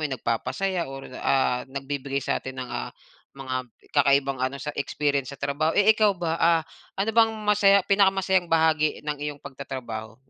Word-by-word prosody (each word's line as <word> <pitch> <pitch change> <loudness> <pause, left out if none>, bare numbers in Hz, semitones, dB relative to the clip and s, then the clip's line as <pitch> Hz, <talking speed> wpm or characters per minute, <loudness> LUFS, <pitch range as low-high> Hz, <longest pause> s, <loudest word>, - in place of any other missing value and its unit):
yung 130 - -3
nagpapasaya 170 +11 -2
or, 135 0 -8 0.2
ah, 130 -2 +2
nagbibigay 140 0 -4
sa'tin 130 0 -3
ng, 125 -1 -6
ah, - - -3 0.5
mga 130 -2 -4 0.2
kakaibang 140 -2 +2
ano, 130 +1 -1
sa 145 +2 -5
experience 140 -1 -1
sa 140 - -8
trabaho. 150 +4 -1
Eh, 205 +2 +6
ikaw 210 -2 +2
ba? 165 -2 -2
Ah, 165 -1 +4 0.3
ano 200 +3 0
bang 225 0 +5 0.2
masaya 200 -2 +4
pinakamasayang 190 -2 +2
bahagi 160 -2 +2
ng 150 0 -2
iyong 145 -1 -5
pagtatrabaho? 120 -5 -7
145 Hz, 155 wpm, -25 LUFS, 135-180 Hz, 0.5 s, Eh